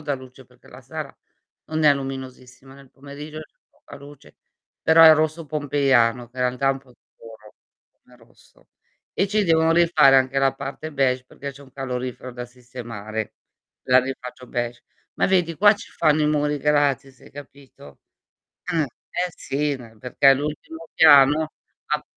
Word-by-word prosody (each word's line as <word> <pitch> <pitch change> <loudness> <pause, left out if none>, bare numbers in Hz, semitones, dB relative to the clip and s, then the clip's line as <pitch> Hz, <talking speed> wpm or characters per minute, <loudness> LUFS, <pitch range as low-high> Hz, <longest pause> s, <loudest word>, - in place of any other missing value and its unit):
dà 145 -2 -2
luce, 130 -1 -13
perché - - -23
la - - -13
sera - - -8 0.5
non 155 0 -2
è 145 - +6
luminosissima, 130 -1 -9
nel 135 -1 -17
pomeriggio 145 +2 -10
c'è 155 - -15
poca - - -15
luce, 140 0 -16 0.5
però 160 +1 +6
è 160 -1 +9
rosso 155 +1 -1
pompeiano 135 -5 +1
che 125 - -15
i - - -2
realtà 125 +2 0
è - - +4
un 135 - -7
po' 135 -2 -23
scuro 110 -3 -17 0.5
come - - -22
rosso; - - -25 0.4
e 195 - 0
ci 210 0 +1
devono 160 -1 +3
rifare 170 -5 +5
anche 130 +1 +2
la 135 0 +2
parte 140 +3 -7
beige, 130 -2 0
perché 140 +2 -9
c'è 140 +2 -15
un 135 - -18
calorifero 125 -1 -5
da 120 0 -7
sistemare, 115 -3 -8 0.5
la 130 0 +5
rifaccio 125 -1 -8
beige. 120 -1 -4 0.3
Ma - - +1
vedi, 180 -3 +1
qua 205 +1 +6
ci 205 - -13
fanno 155 0 +2
i 150 - +2
muri 150 -1 0
gratis, 140 -2 0
hai - - -17
capito, 140 - -14 0.7
eh, 165 - +1
eh, 175 +6 -5
sì, 145 +1 -2
ne 115 -4 -14
perché 130 +4 +2
è - - +6
l'ultimo 155 +3 -6
piano, 150 +1 +5 0.4
ha - - 0
135 Hz, 170 wpm, -22 LUFS, 125-150 Hz, 0.7 s, è